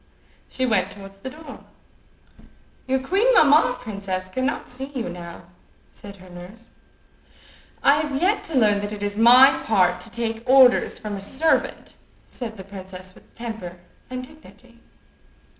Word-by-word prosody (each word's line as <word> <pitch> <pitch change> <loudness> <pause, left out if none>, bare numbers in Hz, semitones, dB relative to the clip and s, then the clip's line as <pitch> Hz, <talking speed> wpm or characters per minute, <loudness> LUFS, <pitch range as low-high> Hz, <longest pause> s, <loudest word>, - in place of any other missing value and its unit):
She 260 - -2
went 215 -7 +1
towards 195 -1 -12
the 260 - -6
door. 300 0 -11 1.3
"Your 265 0 0
queen 395 - +2
mamma, 295 - +5
princess, 195 -4 -5
cannot 260 +8 -3
see 260 +2 -7
you 260 -8 -5
now," 175 0 -9 0.5
said 200 -1 -11
her 185 0 -15
nurse. 180 +6 -13 1.1
"I 285 +2 +5
have 295 -3 -2
yet 395 +5 +1
to 320 -4 -3
learn 210 -4 +3
that 205 0 -5
it 205 -1 -6
is 205 0 -2
my 250 +4 +6
part 180 -4 +2
to 230 - -11
take 225 -1 -4
orders 260 -2 +5
from 210 -2 -6
a - - -8
servant," 275 +11 -1 0.4
said 225 -3 -7
the 190 - -9
princess 185 -1 -11
with - - -22
temper 220 -7 -7 0.3
and 255 0 -5
dignity. 250 -5 -19
230 Hz, 150 wpm, -23 LUFS, 195-265 Hz, 1.3 s, my